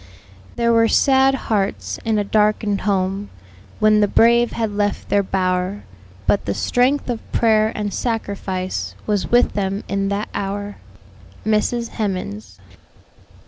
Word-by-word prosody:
"There 235 0 +2
were 230 0 +4
sad 270 +2 +4
hearts 150 - -2
in 220 -1 +1
a 205 - +1
darken'd 210 0 +1
home, 195 0 -1 0.5
When 215 0 +4
the 205 - +4
brave 235 +3 +4
had 225 -2 -1
left 205 0 -2
their 205 - +3
bower; 185 +1 -1 0.4
But 200 - +1
the - - -2
strength 260 +4 +1
of 240 -3 -5
prayer 220 -1 +3
and 210 -2 -3
sacrifice 190 - -3
Was 205 -2 -1
with 240 +1 +3
them 195 0 -2
in 195 0 -1
that 200 +1 -2
hour." 200 +1 -4 0.7
MRS. 225 +2 0
HEMANS. 110 - -4
205 Hz, 135 wpm, -20 LUFS, 195-225 Hz, 0.7 s, were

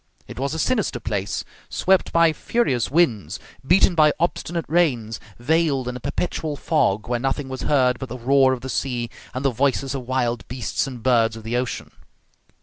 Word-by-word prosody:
It - - -9
was 140 +3 -1
a - - -3
sinister 210 - 0
place, 105 -3 -3 0.2
swept 190 0 +2
by 165 -1 +4
furious 140 - 0
winds, 135 - +1 0.2
beaten 180 +6 +4
by 155 -2 +5
obstinate 170 0 -1
rains, 125 - +1 0.2
veiled 140 0 +1
in 125 - -3
a - - -5
perpetual 150 +3 -3
fog, 110 -10 +1
where 120 0 0
nothing 135 +2 -2
was 130 -1 -5
heard 125 -4 +3
but 130 - -6
the 125 - -6
roar 135 +2 +4
of 130 -2 -2
the 130 - -6
sea 120 -3 -2 0.2
and 130 +2 -3
the 135 - +3
voices 135 +2 0
of 130 -3 -5
wild 120 -2 -1
beasts 125 +2 -2
and 125 -4 -8
birds 115 -3 +3
of 110 - -10
the 115 +2 -3
ocean. 125 0 -3
130 Hz, 185 wpm, -22 LUFS, 120-155 Hz, 0.2 s, by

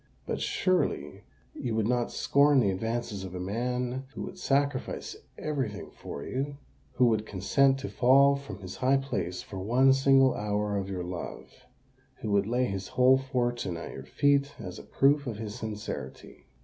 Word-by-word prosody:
"But - - -3
surely 185 -1 0 0.3
you 120 -3 -3
would 110 -1 +1
not 120 0 0
scorn 140 0 +4
the 100 -6 +3
advances 115 +1 -3
of 95 -1 -7
a - - -4
man 125 +6 -2
who - - -4
would 185 - -8
sacrifice 140 -4 -1 0.2
every 145 -6 -2
thing 105 - -9
for 70 - -8
you—who 135 -2 -3
would 110 -2 +1
consent 135 +8 +2
to - - -4
fall 140 +3 +5
from 140 -7 -8
his 95 -1 -8
high 130 +1 +3
place 115 -10 -3
for 95 - -7
one 125 +7 +4
single 135 -1 +5
hour 105 0 -1
of 100 -1 -2
your 90 -2 -3
love—who 90 +4 -9
would 100 0 +2
lay 125 +2 +1
his 95 -5 -4
whole 130 +1 +6
fortune 120 -8 -1
at 85 - -7
your 65 - -8
feet 140 - +2
as 90 -4 -7
a - - -10
proof 140 +1 +2
of 115 -4 -3
his 105 -1 -5
sincerity." 105 - -7
120 Hz, 170 wpm, -29 LUFS, 100-135 Hz, 0.3 s, whole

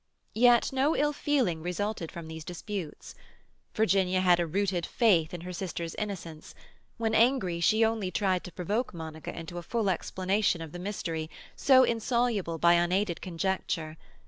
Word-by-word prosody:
Yet 240 +2 +4
no 270 +4 +2
ill 295 +1 +1
feeling 255 - 0
resulted 180 0 -3
from 170 -2 -8
these 160 0 -7
disputes. 180 -1 -6 0.6
Virginia 190 -4 +2
had 180 -2 +4
a 170 - 0
rooted 185 0 0
faith 175 -6 +2
in 175 - -6
her 180 +1 -7
sister's 170 -2 -4
innocence; 175 -7 -6 0.4
when 225 -2 -1
angry, 220 -7 +3
she 215 +6 +4
only 220 -4 -1
tried 185 -2 0
to 180 - -8
provoke 200 +7 -2
Monica 160 -1 -7
into 170 +1 -7
a - - -7
full 210 +2 0
explanation 190 +1 0
of 165 -2 -7
the 175 - -7
mystery, 165 -5 -4 0.3
so 260 -2 +6
insoluble 230 -7 0
by 170 +2 +5
unaided 175 +1 +1
conjecture. 170 -3 -2
185 Hz, 155 wpm, -29 LUFS, 170-220 Hz, 0.6 s, so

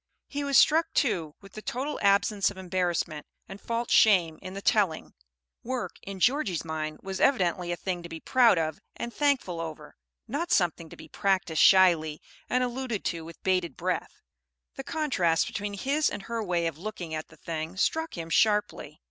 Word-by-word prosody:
He 285 0 -4
was 280 -1 +3
struck, 320 +2 +5
too, 175 - 0
with 195 - -15
the 215 - -8
total 265 +7 -3
absence 200 0 +3
of 200 - -11
embarrassment 175 -4 -2 0.2
and 195 +1 -10
false 235 0 -3
shame 180 -7 +4
in 185 0 -8
the 195 - -5
telling. 195 -8 +1 0.5
Work, 255 +1 -4
in 195 -1 -8
Georgie's 205 - +1
mind, 155 -1 -4
was 190 0 -4
evidently 180 -8 +2
a - - 0
thing 180 -1 -3
to 170 - -9
be 165 -1 -7
proud 240 -4 +4
of 155 -2 -1 0.2
and 235 0 -5
thankful 270 - 0
over, 155 -2 -8 0.3
not 295 +9 -3
something 170 -3 +1
to - - -12
be 160 - -12
practised 185 -3 0
shyly, 170 -5 +5 0.3
and 250 0 +2
alluded 245 -3 -3
to 165 -1 -2
with 165 +1 -12
bated 180 -6 0
breath. - - -3 0.5
The 270 - -7
contrast 260 - +1
between 205 -3 -4
his 280 +9 +1
and 200 -1 -6
her 230 +1 -3
way 175 -3 0
of 160 -2 -3
looking 180 -4 -6
at 155 0 -4
the 160 - -18
thing 160 +3 -5
struck 320 - 0
him 165 -1 -6
sharply. 210 +3 +1
190 Hz, 180 wpm, -28 LUFS, 165-235 Hz, 0.5 s, struck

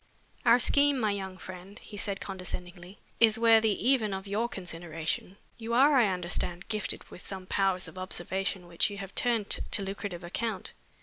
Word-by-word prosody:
"Our 235 - +8
scheme, 285 +2 +4
my 215 -3 +2
young 190 -2 -5
friend," 185 +2 -10
He 210 - -11
said 200 -1 -3
condescendingly, 180 0 -7 0.2
"is 225 -1 +5
worthy 225 -2 +5
even 225 -7 +3
of 190 0 -6
your 215 +4 -1
consideration. 170 0 -4 0.2
You 230 +1 -2
are, 280 +4 +6
I 245 -5 +5
understand, 180 -1 -1
gifted 215 -2 -1
with - - -12
some 190 -2 -6
powers 190 -1 +1
of 185 - -10
observation 185 0 -2
which 175 +3 +1
you 205 - -7
have 195 -1 -7
turned 230 -4 +1
to 200 - +1
lucrative 195 -2 -5
account. 220 +6 -3
195 Hz, 170 wpm, -29 LUFS, 180-225 Hz, 0.2 s, Our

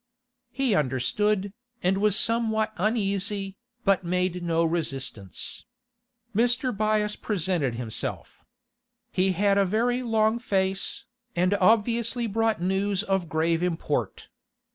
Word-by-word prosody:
He 270 -4 +1
understood, 190 +9 0 0.3
and 190 +2 +2
was 210 -1 +3
somewhat 220 -1 +1
uneasy, 200 -1 -1 0.3
but 195 -2 +3
made 180 0 -1
no 165 -1 +1
resistance. 135 - -3 0.7
Mr. 245 +2 +1
Byass 215 0 +1
presented 175 - -1
himself. 115 -2 -5 0.7
He 185 0 +2
had 200 +2 +3
a - - +5
very 235 +6 +1
long 225 -1 +2
face, 195 -4 -1 0.3
and 180 +3 +2
obviously 230 +4 +2
brought 225 +1 0
news 190 +2 0
of 190 -5 -1
grave 165 +1 +1
import. 175 -2 -2
195 Hz, 110 wpm, -26 LUFS, 180-220 Hz, 0.7 s, a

